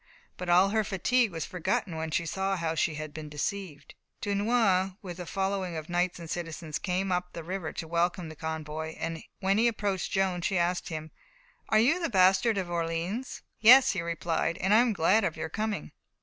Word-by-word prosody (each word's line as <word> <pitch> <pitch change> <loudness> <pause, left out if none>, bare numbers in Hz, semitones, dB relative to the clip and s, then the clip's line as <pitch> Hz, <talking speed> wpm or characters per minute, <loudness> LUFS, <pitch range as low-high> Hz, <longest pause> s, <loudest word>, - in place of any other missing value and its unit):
But 180 -1 -6
all 180 +3 +6
her 220 +1 +1
fatigue 225 +5 +1
was 165 -2 -4
forgotten 175 -1 -2
when 160 0 -3
she 170 +2 0
saw 190 +4 -1
how 165 -2 -1
she 160 -1 0
had 155 -1 -6
been 155 -1 -7
deceived. 150 +1 -4 0.3
Dunois, 200 -2 +2
with 180 -2 -7
a 175 - -6
following 190 -3 -2
of 155 +1 -7
knights 175 +1 0
and 170 -2 -8
citizens, 165 -2 -4
came 185 +1 -1
up 180 0 -1
the 170 - -6
river 180 -1 -4
to 165 - -5
welcome 170 +1 0
the 155 - -9
convoy. 160 0 -5 0.5
When 195 +2 +2
he 235 - +4
approached 205 -5 -1
Joan, 190 -2 +1
she 190 +2 0
asked 175 +1 0
him: 155 -1 -6 0.6
"Are 215 - +4
you 265 +11 +4
the 335 - 0
bastard 195 +2 +4
of 190 -2 -1
Orleans?" 170 +7 -3 0.2
"Yes," 250 +5 +8
he 180 - -2
replied, 170 0 -1
"and 190 +3 +1
I - - +7
am 240 -1 +3
glad 200 +3 +3
of 170 -4 -1
your - - -4
coming." 215 +1 -3
180 Hz, 195 wpm, -29 LUFS, 165-200 Hz, 0.6 s, Yes